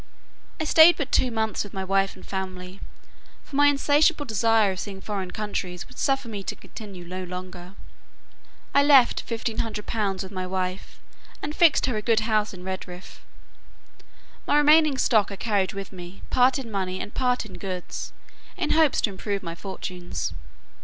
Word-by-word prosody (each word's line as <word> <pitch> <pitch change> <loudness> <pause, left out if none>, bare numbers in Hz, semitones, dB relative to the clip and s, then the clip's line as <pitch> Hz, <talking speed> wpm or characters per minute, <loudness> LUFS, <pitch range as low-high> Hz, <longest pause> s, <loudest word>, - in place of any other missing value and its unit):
I - - 0
stayed 320 +2 +7
but 285 -4 -3
two 255 - +3
months 220 -2 -1
with 205 - -11
my 190 - -2
wife 195 +1 +1
and 185 - -14
family, 185 -1 -6 0.6
for 280 - -10
my 290 +1 +6
insatiable 290 +1 +3
desire 225 -2 +3
of 185 - -5
seeing 195 -2 -6
foreign 195 -2 -4
countries, 185 -4 -4
would 255 - -13
suffer 270 -2 +1
me 210 -3 -5
to - - -5
continue 195 -5 -10
no 185 +2 -5
longer. 180 0 -8 1.0
I 280 - +6
left 280 -4 +5
fifteen 230 -1 -4
hundred 210 -2 -3
pounds 200 -4 -1
with 190 - -9
my 185 -2 -4
wife, 185 0 -4 0.4
and 295 +1 -4
fixed 340 -4 +5
her 255 - -1
in 215 - -1
a - - -5
good 225 0 +2
house 215 -1 +1
at 185 - -10
Redriff. 185 -1 -7 1.3
My 290 - +4
remaining 300 -1 +5
stock 215 -6 +3
I - - -5
carried 200 -3 0
with 195 -1 -7
me, 180 0 -10
part 255 +2 +4
in 250 -5 -6
money 185 -2 -2
and 205 - -6
part 250 -1 0
in - - -11
goods, 185 -3 -5 0.5
in 340 -5 -1
hopes 315 -3 +4
to 210 - +1
improve 200 +1 -4
my 165 -1 -5
fortunes. 175 - -5
205 Hz, 180 wpm, -25 LUFS, 185-250 Hz, 1.3 s, stayed